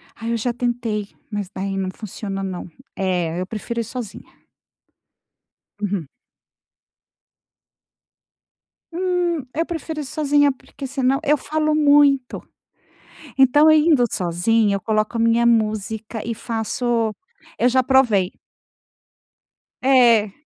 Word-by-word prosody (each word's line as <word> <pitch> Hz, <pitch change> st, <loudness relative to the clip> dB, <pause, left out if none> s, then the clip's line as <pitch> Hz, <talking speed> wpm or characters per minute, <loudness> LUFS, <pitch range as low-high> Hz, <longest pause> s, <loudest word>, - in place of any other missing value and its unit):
Ai, 230 Hz, 0 st, -5 dB
eu 235 Hz, -, 0 dB
já 235 Hz, +2 st, -1 dB
tentei, 235 Hz, -4 st, -2 dB, 0.2 s
mas 205 Hz, -3 st, -4 dB
daí 195 Hz, 0 st, -3 dB
não 190 Hz, -1 st, -2 dB
funciona, 195 Hz, -1 st, -6 dB
não. 185 Hz, -2 st, -5 dB, 0.3 s
Eh, 180 Hz, -3 st, -1 dB
eu -, -, -2 dB
prefiro 230 Hz, +3 st, -5 dB
ir -, -, 0 dB
sozinha. 230 Hz, -2 st, -9 dB, 1.4 s
Uhum. 195 Hz, -6 st, -2 dB, 2.9 s
Hum, 355 Hz, -3 st, 0 dB
eu 330 Hz, +2 st, 0 dB
prefiro 320 Hz, -2 st, -5 dB
ir -, -, -6 dB
sozinha 290 Hz, 0 st, +2 dB
porque 270 Hz, +1 st, -10 dB
senão 270 Hz, 0 st, 0 dB
eu 295 Hz, 0 st, +3 dB
falo 310 Hz, +1 st, -1 dB
muito. 285 Hz, -3 st, +3 dB, 1.0 s
Então, 290 Hz, +4 st, +6 dB
eu 310 Hz, -, +6 dB
indo 300 Hz, -5 st, +4 dB
sozinha, 200 Hz, +4 st, +1 dB
eu -, -, -5 dB
coloco 215 Hz, +2 st, -1 dB
a -, -, -1 dB
minha 230 Hz, +1 st, +3 dB
música 220 Hz, -1 st, 0 dB
e 230 Hz, -, -3 dB
faço 225 Hz, 0 st, -2 dB, 0.4 s
eu -, -, +2 dB
já 260 Hz, +1 st, +3 dB
provei. 240 Hz, -8 st, +3 dB, 1.5 s
É. 235 Hz, -6 st, +5 dB
235 Hz, 115 wpm, -21 LUFS, 210-275 Hz, 2.9 s, Então